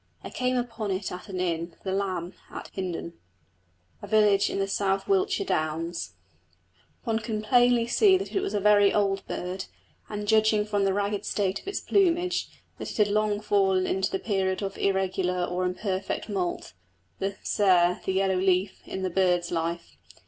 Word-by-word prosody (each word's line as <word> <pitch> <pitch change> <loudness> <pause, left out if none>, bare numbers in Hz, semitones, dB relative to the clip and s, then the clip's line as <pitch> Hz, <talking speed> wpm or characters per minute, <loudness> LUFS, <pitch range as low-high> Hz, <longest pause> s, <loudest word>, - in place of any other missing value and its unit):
I - - -7
came 255 0 0
upon 230 -3 -3
it 190 +1 -2
at 180 +3 -8
an 185 -2 -4
inn, 170 -1 -2
the 190 - -2
Lamb, 185 -2 -2 0.2
at - - -8
Hindon, 175 -3 -4 0.9
a 205 - -8
village 205 -1 +4
in - - -3
the 195 0 0
South 195 0 0
Wiltshire 390 0 +1
downs. 165 - -2 0.9
One 225 -3 0
could 215 -1 -4
plainly 245 +1 +4
see 380 - +5
that 390 - -6
it - - +3
was 395 - -3
a - - +2
very 205 0 +5
old 195 -2 +1
bird, 185 +1 -4 0.4
and, 210 -1 -5
judging 215 -1 +3
from 205 -2 0
the 195 - +2
ragged 205 0 -1
state 200 -1 -1
of - - -21
its 395 - -3
plumage, 360 -2 +1 0.3
that - - -5
it - - -7
had 210 -2 +3
long 210 0 +1
fallen 195 -3 +2
into 190 0 0
the - - -1
period 190 -1 -1
of 195 0 -4
irregular 190 -2 0
or 180 +1 -2
imperfect 190 +2 -2
moult 185 -5 -3 0.5
"the 195 +1 -2
sere, 180 -3 +3
the - - -1
yellow 190 0 +1
leaf" 185 +1 +1
in 190 - -4
the 185 - -1
bird's 180 -1 +1
life. 165 - -3
195 Hz, 180 wpm, -27 LUFS, 185-215 Hz, 0.9 s, see